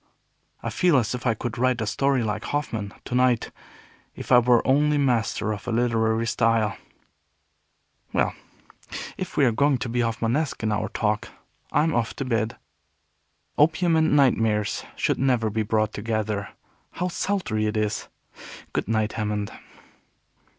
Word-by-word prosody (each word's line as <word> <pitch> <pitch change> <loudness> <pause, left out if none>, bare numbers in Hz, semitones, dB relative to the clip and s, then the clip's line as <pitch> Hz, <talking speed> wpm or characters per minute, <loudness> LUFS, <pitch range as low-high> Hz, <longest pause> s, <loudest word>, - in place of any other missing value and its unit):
I - - -2
feel 175 -5 +3
as 115 -2 +1
if 125 0 -3
I 115 - +2
could 120 +1 -5
write 130 -1 +2
a 110 - -1
story 130 +4 +1
like 105 -1 -3
Hoffman, 110 -8 -3
to - - -6
night, 125 -2 +2 0.6
if - - -8
I 125 - +9
were 120 -1 +3
only 150 +2 +3
master 120 -5 +1
of 100 - -9
a - - -1
literary 115 -1 +1
style." 115 -2 +1 1.4
"Well, - - +1 0.8
if - - -6
we 140 - +5
are 120 - +4
going 140 +4 +2
to 120 - -4
be 120 +1 -1
Hoffmanesque 115 +5 -1
in 110 - +1
our 105 0 -1
talk, 105 -1 -1 0.4
I'm 160 +1 +2
off 115 -2 -1
to 135 - -4
bed. 115 -2 -1 1.0
Opium 165 +3 +3
and 160 -2 +3
nightmares 115 -7 +2
should - - 0
never 125 -5 +2
be 110 +1 0
brought 110 0 0
together. 105 -1 -2 0.4
How 180 - -2
sultry 175 - -1
it 105 +1 -2
is! 105 0 -1 0.7
Good - - -1
night, 110 -1 0
Hammond." 105 -2 -2
115 Hz, 150 wpm, -25 LUFS, 110-130 Hz, 1.4 s, I